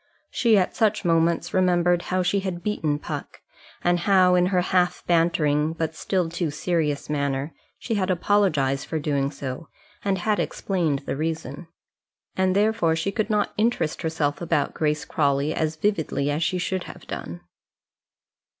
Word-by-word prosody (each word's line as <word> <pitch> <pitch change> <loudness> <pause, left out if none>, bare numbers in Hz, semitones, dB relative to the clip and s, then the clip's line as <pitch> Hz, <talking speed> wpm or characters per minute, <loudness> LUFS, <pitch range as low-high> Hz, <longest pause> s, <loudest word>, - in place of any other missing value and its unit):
She 230 -3 +3
at 185 - +1
such 215 -3 +1
moments 165 0 +2
remembered 175 -1 +3
how 185 0 +1
she 200 +3 +1
had 185 -3 -4
beaten 155 -8 0
Puck, - - -7 0.4
and 175 0 +2
how 185 0 +4
in 180 0 +4
her 185 -1 +2
half 180 0 +1
bantering 160 -3 +2
but 160 -1 -3
still 180 +1 0
too 170 0 -2
serious 150 -1 -1
manner 140 0 -2 0.2
she 230 - -4
had 195 -3 0
apologized 170 -8 +1
for 160 - -2
doing 140 -2 0
so, 140 +1 -6 0.4
and 195 -1 +1
had 210 +3 0
explained 160 -8 -1
the - - -2
reason. 160 +1 -4 0.7
And 190 0 +1
therefore 210 -5 +2
she 165 +4 -1
could 215 +1 -1
not 210 -1 +1
interest 215 -8 0
herself 155 -2 -1
about 170 - 0
Grace 150 -1 -1
Crawley 140 0 +1
as 160 0 -1
vividly 160 -6 0
as 150 +2 -1
she 180 +3 +1
should 185 0 -2
have - - -11
done. 85 +1 -6
170 Hz, 160 wpm, -24 LUFS, 150-185 Hz, 0.7 s, how